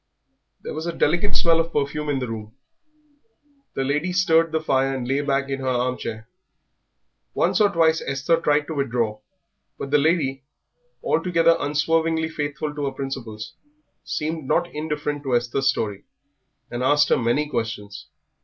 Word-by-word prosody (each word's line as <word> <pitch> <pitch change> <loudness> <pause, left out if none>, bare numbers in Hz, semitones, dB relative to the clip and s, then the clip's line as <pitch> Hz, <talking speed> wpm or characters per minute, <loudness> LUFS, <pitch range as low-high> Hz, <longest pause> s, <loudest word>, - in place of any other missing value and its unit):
There - - -5
was 160 +2 -4
a 170 - -2
delicate 175 +7 +2
smell 165 -1 +4
of 165 0 0
perfume 150 +1 -1
in 145 - +1
the 125 -1 -2
room; 110 0 -7 1.2
the 135 - 0
lady 150 +6 0
stirred 165 -3 +3
the 160 - +1
fire 135 -3 +1
and 125 -2 -4
lay 135 +2 +1
back 140 -1 0
in 135 0 -3
her 130 - -4
armchair. 125 -3 -2 1.1
Once - - +2
or 205 - +6
twice 165 -3 +3
Esther 140 +5 +1
tried 145 0 +2
to 160 - -5
withdraw, 120 -6 -1 0.6
but 140 - -6
the 150 - +5
lady, 140 -3 +1 0.6
although 165 0 +3
unswervingly 160 +2 +1
faithful 150 -1 -3
to 145 -1 -3
her 135 - -1
principles, 130 -5 -6 0.5
seemed 155 0 -3
not 175 +4 +1
indifferent 150 -1 -3
to 135 -3 0
Esther's 120 +3 +1
story, 105 -6 -2 0.7
and 120 - -3
asked 145 +2 +4
her - - +4
many 120 +6 +1
questions. 110 -5 -4
145 Hz, 155 wpm, -23 LUFS, 130-160 Hz, 1.2 s, or